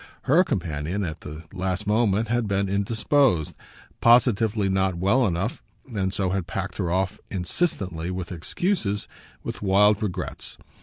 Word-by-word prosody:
Her 165 +7 +5
companion, 85 - -2
at 80 -3 -5
the 75 +2 -8
last 95 +2 -2
moment, 110 0 +2
had 120 0 0
been 100 0 0
indisposed 105 - +2 0.5
positively 115 -3 +4
not 95 -1 +1
well 100 +8 +3
enough, 95 +5 -2 0.3
and 95 -2 0
so 95 -1 -1
had 95 -3 -2
packed 95 +2 -4
her 90 -4 0
off, 95 +3 0
insistently, 90 - -2
with 90 -1 -4
excuses, 105 - -1 0.4
with - - -5
wild 105 +1 +4
regrets. 95 -4 -4
100 Hz, 140 wpm, -25 LUFS, 90-110 Hz, 0.5 s, Her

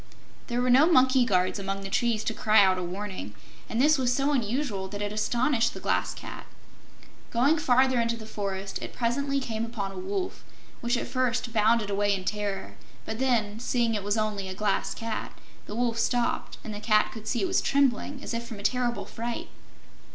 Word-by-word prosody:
There 245 0 0
were 250 - +3
no 275 +6 +7
monkey 260 -3 +5
guards 185 -2 +1
among 195 0 -3
the 195 - -5
trees 230 -1 +1
to 225 - -1
cry 215 -1 +5
out 185 -1 +3
a - - -3
warning, 185 - -5 0.3
and 225 - -1
this 300 +2 +5
was 250 -2 +2
so 275 +3 +1
unusual 235 -5 -1
that 205 +1 -6
it 205 0 -2
astonished 235 +2 +1
the - - -6
Glass - - 0
Cat. - - -9 0.8
Going 280 +7 +3
farther 260 -2 +3
into 230 0 0
the 220 - -9
forest 195 -2 -4
it - - -7
presently 275 +4 0
came 225 -4 -3
upon 220 -4 -4
a 190 - -7
wolf, 380 - -3 0.4
which 240 +1 0
at - - -2
first 250 -2 -1
bounded 220 -1 +3
away 205 0 +2
in 185 -1 -6
terror. 205 -2 -3 0.3
But 220 +1 -4
then, 225 -5 +1
seeing 235 -1 +1
it 210 - -1
was 205 +2 0
only 210 -3 -1
a 185 - -5
Glass 205 0 0
Cat, 225 -2 -5 0.3
the 205 - -6
Wolf 235 -1 0
stopped, 240 0 0
and 215 - -6
the 205 - -5
Cat 215 0 +3
could 220 -1 -9
see 240 - 0
it - - +1
was 370 +1 +2
trembling, 275 0 +1
as - - -4
if 230 0 -2
from 225 - -7
a 200 - -9
terrible 245 +1 0
fright. 235 +1 -5
230 Hz, 205 wpm, -27 LUFS, 205-250 Hz, 0.8 s, no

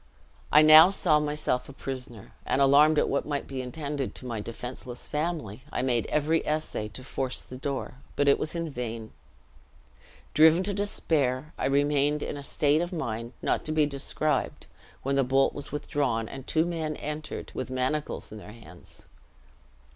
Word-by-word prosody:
"I 150 - +8
now 155 +3 +10
saw 170 -6 +3
myself 150 -4 -1
a - - -9
prisoner; 125 -6 -6
and - - 0
alarmed 145 +3 +6
at - - +3
what 140 - 0
might 145 -1 -3
be 135 -1 -5
intended 140 +1 -4
to - - -8
my 115 -3 -3
defenseless 120 +2 -7
family, 150 - -3
I 125 - -1
made 120 -3 +1
every 150 +2 +1
essay 155 -8 -2
to 120 +5 -9
force 130 0 -3
the 130 - -10
door, 135 -1 -4 0.2
but 145 - +1
it 140 - +5
was 155 - -3
in 165 -2 -3
vain. 115 -3 -5 1.2
Driven 160 +4 +6
to 200 +1 -2
despair, 155 -8 -1
I - - -3
remained 145 +1 +2
in - - -4
a 145 - -6
state 145 +2 +1
of 175 - -3
mind 120 -8 -4
not - - +1
to 155 - -3
be 155 -1 +3
described, 145 +2 -2 0.4
when 140 +1 0
the 135 - +4
bolt 135 +2 +2
was 145 - -5
withdrawn, 140 -6 -1
and 135 +2 -9
two 160 +1 +2
men 160 -3 -3
entered, 150 0 -6
with - - -4
manacles 130 +4 -2
in 110 - -8
their 105 +1 -11
hands. 90 -7 -13
140 Hz, 175 wpm, -27 LUFS, 125-155 Hz, 1.2 s, now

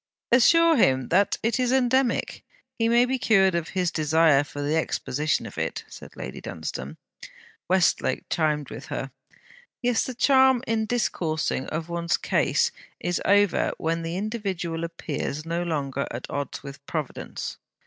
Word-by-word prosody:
'Assure 330 +7 +6
him, 130 - +3
that 200 +4 +3
is 245 +2 +1
endemic. 260 -1 +1 0.4
He 230 0 +2
may 240 +1 +5
be 260 +1 -1
cured 195 -5 +4
of 170 -1 -1
his 180 -2 +1
desire 155 -2 +3
for 145 0 -9
the 150 +2 0
exposition 150 -2 -1
of - - -7
it,' - - -3
said - - -12
Lady - - -7
Dunstane. - - -6 0.7
Westlake 185 -1 +2
chimed 150 -3 0
with - - -8
her: 135 - -4 0.7
'Yes, 245 -2 +1
the 255 - -5
charm 265 -1 +4
in 220 -2 0
discoursing 160 - -1
of 160 +1 -4
one's 170 -1 0
case - - +1 0.3
is 175 0 -1
over 205 -1 +3
when 165 +1 -1
the 165 +2 -3
individual 190 -6 -3
appears 155 -2 -4
no 170 +1 -2
longer 140 -5 -2
at 120 - -6
odds 145 -2 -4
with 140 0 -10
Providence.' 155 -5 -5
170 Hz, 150 wpm, -25 LUFS, 155-230 Hz, 0.7 s, Assure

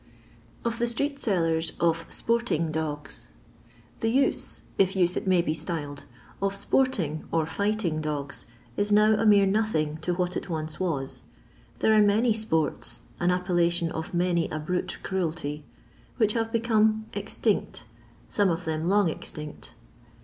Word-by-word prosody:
Of 230 0 -1
the 240 - +2
Stkeet 280 +5 -1
Sbllers 165 -9 +1
of 165 -1 +1
Sportiieo 230 -9 0
Doos. 150 -2 -4 0.7
The 225 - +1
use, 270 +4 +1 0.2
if 195 0 +3
use 180 -1 +2
it - - -3
may 180 -2 +4
be 155 - 0
styled, 150 -3 -4 0.4
of 195 0 0
sporting, 200 - 0
or 165 -1 +2
fighting 200 -2 -1
dogs, 145 -4 -3 0.3
is 205 +6 0
now 210 +1 +6
a 220 +1 +2
mere 200 -1 +6
nothing 190 -7 +1
to 175 +2 -1
what 180 0 -1
it - - -4
once 155 -2 -3
was. 150 -8 -2 0.6
There 220 - +5
are 215 - +6
many 215 +3 +4
sports 160 -9 0
— - - -27
an 175 - +2
appellation 175 -2 +1
of 160 +5 -5
many 175 -2 +1
a 155 - -3
brute 180 +4 -2
cruelty 160 -5 -2 0.3
— - - -29
which 215 -4 +3
have 225 -1 -1
become 220 -2 +2
ex - - -5
tinct, - - 0 0.4
some 205 -2 +2
of 170 +1 -2
them 160 +1 -1
long 200 -1 +4
extinct. 150 -1 -6
180 Hz, 155 wpm, -27 LUFS, 160-215 Hz, 0.7 s, now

